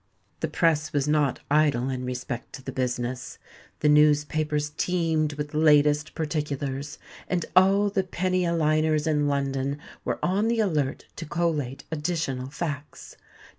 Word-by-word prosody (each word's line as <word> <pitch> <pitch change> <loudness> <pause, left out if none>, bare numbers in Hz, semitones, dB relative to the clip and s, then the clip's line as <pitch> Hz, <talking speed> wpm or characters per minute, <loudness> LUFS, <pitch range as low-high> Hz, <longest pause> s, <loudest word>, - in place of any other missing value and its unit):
The - - -1
press 155 -2 +1
was 145 -1 +1
not 150 -3 +1
idle 145 -5 +3
in 130 -1 -3
respect 125 0 -5
to 135 - -9
the 135 - -5
business. 125 0 -3 0.4
The 150 - +4
newspapers 150 0 +3
teemed 160 -2 0
with 150 0 -5
"Latest 150 -1 +3
Particulars;" 145 -2 -3 0.3
and 180 -2 -1
all 195 +2 +5
the 195 - +2
penny 185 0 0
a 170 -1 +1
liners 155 -1 +2
in 150 -2 +1
London 140 0 -1 0.3
were - - -1
on 195 +5 +1
the 230 0 +1
alert 155 -10 0
to 165 - -6
collate 150 -6 -1
additional 150 -5 -2
facts. 150 -1 -6
150 Hz, 140 wpm, -26 LUFS, 140-165 Hz, 0.4 s, all